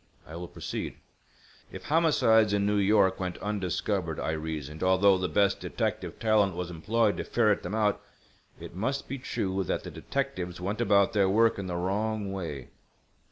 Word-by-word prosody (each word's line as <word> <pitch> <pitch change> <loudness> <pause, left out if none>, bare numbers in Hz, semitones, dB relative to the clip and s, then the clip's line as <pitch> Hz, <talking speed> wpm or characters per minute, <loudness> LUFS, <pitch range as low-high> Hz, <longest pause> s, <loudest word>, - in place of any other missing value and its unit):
I 80 - -10
will 85 +1 -6
proceed. - - -5 0.8
"If - - -8
homicides 115 -10 +3
in 100 -1 +2
New 105 0 +2
York 100 -1 +3
went 90 -2 -3
undiscovered, 95 -4 -2
I - - -1
reasoned, 80 -1 -5
although 95 +1 +4
the 90 - -1
best 100 -1 +2
detective - - -3
talent 105 -4 +2
was 90 0 -4
employed 105 +6 +1
to - - -2
ferret 110 -4 +2
them 95 +5 -4
out, 105 -2 +1 0.6
it - - -9
must 130 +10 -2
be 135 +1 -5
true 95 -5 -2
that - - -2
the - - -7
detectives 90 -1 -4
went 100 +5 -3
about 100 -1 +3
their 100 -3 +3
work 110 +2 +3
in 95 - -4
the 90 - -3
wrong 100 +3 -1
way. 80 -9 -5
100 Hz, 170 wpm, -28 LUFS, 90-105 Hz, 0.8 s, although